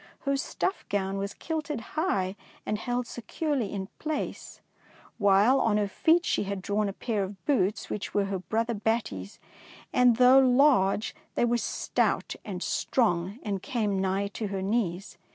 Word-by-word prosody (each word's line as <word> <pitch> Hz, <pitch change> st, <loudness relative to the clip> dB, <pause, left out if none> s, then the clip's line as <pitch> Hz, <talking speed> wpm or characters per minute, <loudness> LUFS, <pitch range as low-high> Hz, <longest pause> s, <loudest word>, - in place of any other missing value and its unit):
Her 275 Hz, -1 st, 0 dB
stuff 370 Hz, +7 st, -2 dB
gown 195 Hz, -1 st, -1 dB
was 200 Hz, 0 st, -4 dB
kilted 310 Hz, -4 st, -3 dB
high 200 Hz, -, 0 dB, 0.3 s
and 210 Hz, -, -1 dB
held 245 Hz, +1 st, -2 dB
securely 245 Hz, 0 st, -3 dB
in 195 Hz, -2 st, -3 dB
place, 310 Hz, -2 st, -4 dB, 0.6 s
while 205 Hz, +6 st, +5 dB
on 215 Hz, -2 st, +2 dB
her 205 Hz, -1 st, +1 dB
feet 330 Hz, -, +3 dB
she -, -, 0 dB
had 195 Hz, -1 st, -4 dB
drawn 205 Hz, +1 st, 0 dB
a -, -, -5 dB
pair 215 Hz, 0 st, -2 dB
of 195 Hz, 0 st, -6 dB
boots 210 Hz, -7 st, +1 dB
which 210 Hz, +1 st, -4 dB
were 205 Hz, -1 st, +1 dB
her 195 Hz, -1 st, -2 dB
brother 230 Hz, +5 st, -1 dB
Batty 215 Hz, -, -1 dB
^s, 100 Hz, -, -16 dB, 0.6 s
and, 250 Hz, -2 st, +5 dB
though 255 Hz, +2 st, +7 dB
large, 250 Hz, -6 st, +4 dB, 0.2 s
they -, -, +3 dB
were 240 Hz, 0 st, +2 dB
stout -, -, -1 dB
and -, -, -5 dB
strong 195 Hz, -4 st, 0 dB
and 200 Hz, -3 st, -2 dB
came 210 Hz, -7 st, -1 dB
nigh 195 Hz, +1 st, 0 dB
to 210 Hz, +1 st, -4 dB
her 195 Hz, -1 st, -3 dB
knees. 195 Hz, -2 st, -2 dB
210 Hz, 165 wpm, -28 LUFS, 195-250 Hz, 0.6 s, though